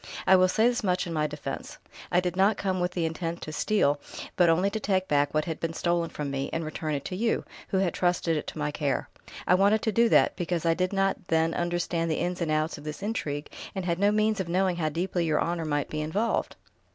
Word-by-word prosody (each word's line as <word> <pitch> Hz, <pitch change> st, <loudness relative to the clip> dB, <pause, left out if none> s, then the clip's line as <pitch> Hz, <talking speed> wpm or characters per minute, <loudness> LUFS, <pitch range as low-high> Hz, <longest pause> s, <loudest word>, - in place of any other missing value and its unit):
"I 190 Hz, -, +7 dB
will 185 Hz, 0 st, +5 dB
say 220 Hz, +5 st, +3 dB
this 245 Hz, -1 st, 0 dB
much 180 Hz, -1 st, +1 dB
in 170 Hz, -, -5 dB
my 155 Hz, -1 st, +1 dB
defence: 150 Hz, 0 st, -6 dB, 0.3 s
I 175 Hz, -, +4 dB
did 180 Hz, -1 st, -2 dB
not 195 Hz, +3 st, +3 dB
come 190 Hz, -2 st, -1 dB
with 180 Hz, +1 st, -2 dB
intent 165 Hz, 0 st, -2 dB
to 155 Hz, -, -6 dB
steal, 145 Hz, -8 st, +1 dB, 0.3 s
but 175 Hz, -2 st, +5 dB
only 180 Hz, +5 st, +3 dB
to 220 Hz, -, -2 dB
take 190 Hz, -3 st, 0 dB
back 145 Hz, -1 st, +2 dB
what 155 Hz, 0 st, 0 dB
had 160 Hz, -2 st, -4 dB
been 165 Hz, 0 st, -2 dB
stolen 170 Hz, 0 st, 0 dB
from 145 Hz, -2 st, -4 dB
me, 135 Hz, 0 st, -2 dB
and 165 Hz, 0 st, -2 dB
return 155 Hz, 0 st, -3 dB
it 140 Hz, -, -5 dB
to 185 Hz, -, -4 dB
you, 225 Hz, +4 st, 0 dB, 0.2 s
who 190 Hz, -, -1 dB
had 190 Hz, -3 st, +1 dB
trusted 175 Hz, -2 st, +1 dB
it 150 Hz, -, -3 dB
to -, -, -6 dB
my 150 Hz, -1 st, -1 dB
care. 145 Hz, -2 st, -1 dB, 0.4 s
I -, -, +5 dB
wanted 200 Hz, +3 st, +4 dB
to 220 Hz, -, +1 dB
do 230 Hz, +2 st, +4 dB
that, -, -, +4 dB
because 175 Hz, -2 st, -2 dB
I 165 Hz, -, +4 dB
did 185 Hz, +2 st, -1 dB
not 195 Hz, -2 st, 0 dB
then 165 Hz, 0 st, +2 dB
understand 175 Hz, -1 st, -1 dB
the 160 Hz, -, +1 dB
ins 180 Hz, +2 st, -2 dB
and 165 Hz, -, 0 dB
outs 155 Hz, 0 st, 0 dB
of -, -, -12 dB
this 150 Hz, +5 st, -6 dB
intrigue, 150 Hz, -9 st, -3 dB, 0.2 s
and 190 Hz, -2 st, -3 dB
had 170 Hz, -1 st, 0 dB
no 200 Hz, +1 st, +4 dB
means 215 Hz, 0 st, +2 dB
of 185 Hz, -3 st, -3 dB
knowing 185 Hz, 0 st, +1 dB
how 155 Hz, -3 st, 0 dB
deeply 175 Hz, +3 st, -1 dB
your 155 Hz, -2 st, +1 dB
honour 170 Hz, -1 st, -1 dB
might 145 Hz, -2 st, -1 dB
be 155 Hz, -, -2 dB
involved." 200 Hz, +10 st, -1 dB
175 Hz, 250 wpm, -27 LUFS, 155-190 Hz, 0.4 s, I